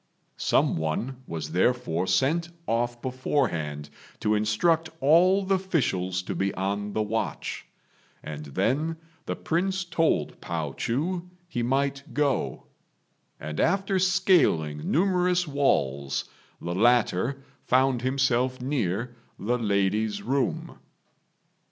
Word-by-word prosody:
Some -, -, +2 dB
one 110 Hz, +12 st, -2 dB
was 80 Hz, -2 st, -5 dB
therefore 95 Hz, -2 st, +1 dB
sent 145 Hz, -, +2 dB, 0.2 s
off 120 Hz, +1 st, -1 dB
beforehand 105 Hz, -, -1 dB, 0.3 s
to 105 Hz, -, +2 dB
instruct 150 Hz, +11 st, +2 dB
all 180 Hz, +7 st, +5 dB
the 195 Hz, -, +2 dB
officials 105 Hz, -, 0 dB
to -, -, -4 dB
be 95 Hz, 0 st, 0 dB
on 100 Hz, +2 st, -2 dB
the 110 Hz, -, +1 dB
watch, 110 Hz, +2 st, -3 dB, 0.6 s
and 75 Hz, 0 st, -6 dB
then 130 Hz, -, 0 dB, 0.3 s
the -, -, -1 dB
Prince 190 Hz, +3 st, -1 dB
told 170 Hz, -2 st, 0 dB
Pao -, -, -3 dB
chu 170 Hz, +9 st, -2 dB, 0.2 s
he 120 Hz, -9 st, -3 dB
might 135 Hz, +3 st, -1 dB
go; 145 Hz, -2 st, 0 dB, 0.8 s
and 75 Hz, 0 st, -5 dB
after 195 Hz, +2 st, +2 dB
scaling 165 Hz, -, +2 dB
numerous 180 Hz, 0 st, +2 dB
walls 70 Hz, -, 0 dB, 0.3 s
the 85 Hz, -, -4 dB
latter 120 Hz, +4 st, +2 dB, 0.2 s
found 130 Hz, -1 st, +2 dB
himself 130 Hz, -1 st, +1 dB
near 120 Hz, -3 st, -2 dB, 0.2 s
the 120 Hz, +4 st, -1 dB
lady's 105 Hz, 0 st, 0 dB
room. 135 Hz, +2 st, -1 dB
125 Hz, 110 wpm, -26 LUFS, 95-160 Hz, 0.8 s, all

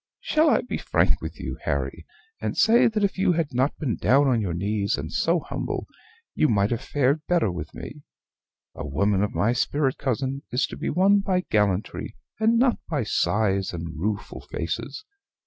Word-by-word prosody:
Shall 310 Hz, 0 st, +2 dB
I -, -, +3 dB
be -, -, -4 dB
frank -, -, +1 dB
with -, -, -7 dB
you, -, -, -5 dB
Harry, -, -, -2 dB, 0.3 s
and -, -, -3 dB
say 225 Hz, +3 st, +5 dB
that 215 Hz, -2 st, 0 dB
if 195 Hz, -1 st, 0 dB
you 185 Hz, -, +3 dB
had 165 Hz, -5 st, -1 dB
not 130 Hz, +4 st, +1 dB
been 130 Hz, -8 st, -2 dB
down 140 Hz, +2 st, +4 dB
on 120 Hz, -4 st, +2 dB
your 90 Hz, -5 st, -2 dB
knees, 100 Hz, +2 st, 0 dB
and 75 Hz, +3 st, -6 dB
so 170 Hz, +1 st, +2 dB
humble, -, -, -4 dB, 0.5 s
you 155 Hz, -, +2 dB
might 100 Hz, 0 st, +2 dB
have 115 Hz, -, -1 dB
fared 145 Hz, +2 st, +1 dB
better 170 Hz, -, +2 dB
with 80 Hz, -3 st, -7 dB
me? 150 Hz, -, -8 dB, 0.7 s
A 80 Hz, -, -7 dB
woman 95 Hz, +7 st, +1 dB
of 105 Hz, -, -1 dB
my 115 Hz, +4 st, +2 dB
spirit, 135 Hz, +1 st, 0 dB
cousin, 135 Hz, +1 st, -1 dB
is 125 Hz, +3 st, +1 dB
to -, -, -8 dB
be -, -, -3 dB
won 195 Hz, +5 st, +4 dB
by 190 Hz, -2 st, 0 dB
gallantry, 105 Hz, -2 st, 0 dB, 0.2 s
and 225 Hz, +1 st, +3 dB
not 250 Hz, 0 st, +3 dB
by 150 Hz, -6 st, 0 dB
sighs 100 Hz, -3 st, +1 dB
and 85 Hz, -1 st, -5 dB
rueful 100 Hz, +5 st, -3 dB
faces. 115 Hz, -, -4 dB
130 Hz, 185 wpm, -25 LUFS, 100-170 Hz, 0.7 s, say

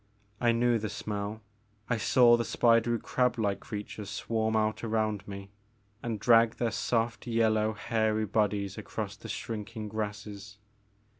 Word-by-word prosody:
I 120 Hz, -1 st, +3 dB
knew 120 Hz, 0 st, +2 dB
the 110 Hz, 0 st, -3 dB
smell, 105 Hz, +2 st, -4 dB, 0.4 s
I 115 Hz, -, +1 dB
saw 120 Hz, +2 st, +5 dB
the 120 Hz, -, 0 dB
spidery 115 Hz, 0 st, +3 dB
crab 125 Hz, +2 st, 0 dB
like 100 Hz, -3 st, 0 dB
creatures 105 Hz, -1 st, -6 dB
swarm 110 Hz, 0 st, -1 dB
out 110 Hz, 0 st, 0 dB
around 110 Hz, -3 st, -1 dB
me 100 Hz, -1 st, -8 dB, 0.5 s
and 115 Hz, -3 st, -3 dB
drag 115 Hz, 0 st, +5 dB
their 120 Hz, -2 st, -1 dB
soft 115 Hz, +1 st, -1 dB
yellow 110 Hz, -2 st, +2 dB
hairy 110 Hz, +1 st, 0 dB
bodies 105 Hz, -1 st, 0 dB
across -, -, -5 dB
the -, -, -11 dB
shrinking 110 Hz, 0 st, -5 dB
grasses. 105 Hz, -1 st, -5 dB
110 Hz, 140 wpm, -30 LUFS, 105-115 Hz, 0.5 s, saw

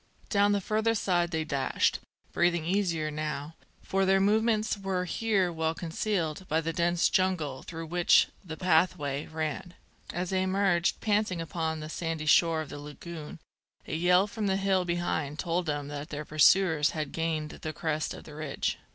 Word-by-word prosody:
Down 205 Hz, -1 st, +4 dB
the 205 Hz, -, +2 dB
further 220 Hz, +3 st, +1 dB
side 175 Hz, -4 st, +1 dB
they 160 Hz, -2 st, -1 dB
dashed, 140 Hz, -4 st, 0 dB, 0.3 s
breathing 175 Hz, -2 st, +2 dB
easier 170 Hz, -4 st, 0 dB
now, 150 Hz, 0 st, -4 dB, 0.3 s
for 195 Hz, 0 st, 0 dB
their 195 Hz, 0 st, +4 dB
movements 215 Hz, +2 st, +2 dB
were 190 Hz, -2 st, -2 dB
here 195 Hz, -3 st, 0 dB
well 160 Hz, 0 st, -1 dB
concealed 170 Hz, 0 st, -2 dB
by 160 Hz, -, +1 dB
the 165 Hz, 0 st, -2 dB
dense 170 Hz, 0 st, +2 dB
jungle 165 Hz, -8 st, 0 dB
through 165 Hz, -1 st, -7 dB
which 175 Hz, +2 st, +4 dB, 0.2 s
the 160 Hz, -4 st, -7 dB
pathway 160 Hz, -5 st, +1 dB
ran. 160 Hz, +2 st, -4 dB, 0.4 s
As 180 Hz, +1 st, -3 dB
they 190 Hz, -1 st, +1 dB
emerged 190 Hz, -2 st, +1 dB
panting 210 Hz, -4 st, +1 dB
upon 160 Hz, -1 st, -3 dB
the 155 Hz, -, -6 dB
sandy 160 Hz, -1 st, -3 dB
shore 160 Hz, +1 st, +4 dB
of 155 Hz, -, -7 dB
the 145 Hz, -, -7 dB
lagoon, 150 Hz, +2 st, -8 dB, 0.5 s
a -, -, -5 dB
yell 180 Hz, +3 st, +4 dB
from 210 Hz, 0 st, -3 dB
the 190 Hz, 0 st, +2 dB
hill 195 Hz, -2 st, +1 dB
behind 170 Hz, -4 st, -2 dB
told 175 Hz, 0 st, -1 dB
them 145 Hz, -1 st, -2 dB
that 145 Hz, +2 st, -6 dB
their 150 Hz, -1 st, -5 dB
pursuers 155 Hz, 0 st, +4 dB
had 150 Hz, -3 st, -3 dB
gained 160 Hz, -2 st, -2 dB
the 155 Hz, -, -3 dB
crest 155 Hz, -1 st, -2 dB
of -, -, -11 dB
the 150 Hz, -, -12 dB
ridge. 150 Hz, -2 st, -3 dB
170 Hz, 170 wpm, -29 LUFS, 155-190 Hz, 0.5 s, Down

